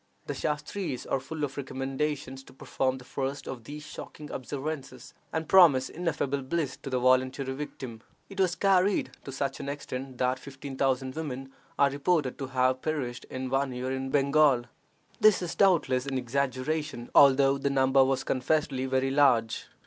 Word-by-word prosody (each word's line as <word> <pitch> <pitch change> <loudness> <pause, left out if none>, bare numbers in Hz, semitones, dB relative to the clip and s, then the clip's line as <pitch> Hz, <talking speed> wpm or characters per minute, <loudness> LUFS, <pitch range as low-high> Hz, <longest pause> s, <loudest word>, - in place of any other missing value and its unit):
The - - -3
Shastres 150 -1 -3
are 135 - 0
full 150 +3 -6
of 140 -1 -3
recommendations 135 0 -3
to - - -15
perform 130 0 -1
the 130 - -12
first 135 +2 -4
of 120 -4 -7
these 150 +2 -8
shocking 150 -1 -9
observances, 135 -1 -6 0.2
and 160 -1 -2
promise 160 -9 +6
ineffable 150 -5 -2
bliss 140 0 -2
to - - -8
the 130 - 0
voluntary 130 +1 +2
victim. 130 -5 -7 0.3
It 195 0 -10
was 185 -2 +2
carried 195 0 +2
to 135 - -6
such 135 0 -3
an 140 - -4
extent 135 -2 -6
that 130 +1 +1
fifteen 140 0 -8
thousand 130 -1 0
women 135 -4 -5 0.2
are 140 -1 +4
reported 145 -1 0
to 135 - -3
have 130 0 +1
perished 135 -6 -3
in 130 0 -5
one 135 -1 +1
year 125 +1 -3
in 135 0 -3
Bengal. 140 -2 +4 0.6
This 215 -2 +6
is 170 - -3
doubtless 145 -9 +3
an 135 -1 -1
exaggeration, 130 +1 -2
although 135 0 +6
the 140 - 0
number 135 0 +4
was 130 0 0
confessedly 130 0 0
very 130 0 +1
large. 125 -6 +3
135 Hz, 165 wpm, -28 LUFS, 130-150 Hz, 0.6 s, promise